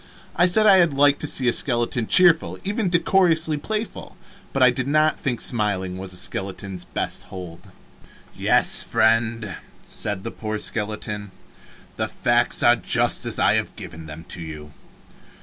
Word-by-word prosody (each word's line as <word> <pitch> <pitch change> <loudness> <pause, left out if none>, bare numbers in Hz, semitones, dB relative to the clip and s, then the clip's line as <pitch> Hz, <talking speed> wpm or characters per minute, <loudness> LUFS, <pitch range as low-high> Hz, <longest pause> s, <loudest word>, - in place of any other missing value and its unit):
I 175 +2 +4
said 215 +4 +3
I 190 -4 +6
liked 145 -2 +1
to 150 - -3
see 130 -3 0
a 120 - +3
skeleton 120 -2 -1
cheerful, 175 -3 +5
even 205 0 -2
decorously 170 -3 +2
playful, 215 +9 -6 0.3
but 135 - +1
I 125 - +6
did 130 +1 -4
not 155 +2 +1
think 125 -5 -3
smiling 100 -6 -1
was 95 0 -7
a - - -6
skeleton's 95 -1 -6
best - - -4
hold. 90 -3 -11 0.7
"Yes, - - +4
friend," 110 -2 0 0.3
said 100 -2 -4
the 115 - -5
poor 110 -1 -5
skeleton, 105 -1 -4 0.7
"the - - -2
facts 120 0 0
are 120 - +5
just - - +1
as - - 0
I - - +2
have - - -2
given 80 0 -10
them 80 +1 -10
to 85 - -5
you. 75 -2 -9
120 Hz, 155 wpm, -22 LUFS, 100-155 Hz, 0.7 s, I